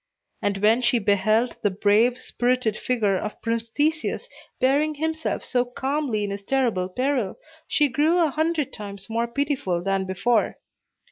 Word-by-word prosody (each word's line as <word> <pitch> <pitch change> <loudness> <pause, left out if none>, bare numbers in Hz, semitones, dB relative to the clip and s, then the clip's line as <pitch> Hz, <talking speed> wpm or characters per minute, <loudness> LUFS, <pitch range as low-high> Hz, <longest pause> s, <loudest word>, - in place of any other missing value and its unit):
And 200 -1 0
when 225 +4 +5
she 245 0 +3
beheld 215 +3 +2
the 205 - +2
brave, 210 +5 +3
spirited 245 -3 0
figure 215 -7 0
of 210 - -5
Prince 230 0 -2
Theseus 315 - -1 0.3
bearing 290 +4 +2
himself 320 +1 -2
so 245 -1 +1
calmly 255 -2 -2
in 200 - -2
his 200 0 -5
terrible 230 -7 0
peril, 250 -1 -1 0.3
she 295 - +3
grew 300 +6 +2
a 330 -4 +3
hundred 315 -1 0
times 200 0 -9
more 230 +1 0
pitiful 260 - -1
than 195 0 0
before. 200 +5 +1
240 Hz, 150 wpm, -24 LUFS, 205-280 Hz, 0.3 s, when